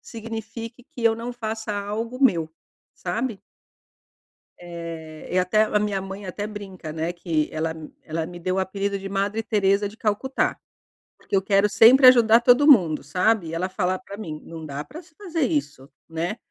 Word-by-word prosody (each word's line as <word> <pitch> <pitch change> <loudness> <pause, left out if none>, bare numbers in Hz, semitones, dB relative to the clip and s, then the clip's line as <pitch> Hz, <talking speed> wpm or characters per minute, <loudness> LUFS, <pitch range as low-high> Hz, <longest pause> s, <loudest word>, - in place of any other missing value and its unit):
signifique 230 +1 -8
que 235 - -7
eu 225 -1 +5
não 240 +2 -6
faça 220 -2 -4
algo 210 +4 -3
meu, 165 -9 +2 0.4
sabe? 230 -5 -3 1.2
Eh, 165 -2 -8
e 185 - +1
até 215 +4 +3
a 210 -1 +1
minha 205 -2 -1
mãe 195 +1 -7
até 205 +3 -4
brinca, 195 -6 -8
né, 165 +2 -3
que 165 -3 -1
ela 160 +1 -2 0.3
ela 160 +1 -3
me 175 +1 -9
deu 185 +2 -1
o - - +1
apelido 200 +1 -2
de 195 - -6
Madre 200 +3 -1
Teresa 205 -1 +2
de 210 - -12
Calcutá, 225 +6 -1 0.6
porque 195 - -2
eu 190 - +2
quero 200 +1 +3
sempre 255 +6 +7
ajudar 235 -2 +6
todo 245 +4 +5
mundo, 170 - +5
sabe? 180 +3 +1
Ela 180 +3 -1
falar 185 -1 -1
pra 200 +1 -10
mim: 155 -8 -7
"Não 160 -1 -9
dá 140 0 -5
pra 330 +4 -10
se 315 -1 -24
fazer 345 -5 -4
isso." 280 - -3 0.2
Né? 165 +6 -3
200 Hz, 175 wpm, -24 LUFS, 175-225 Hz, 1.2 s, sempre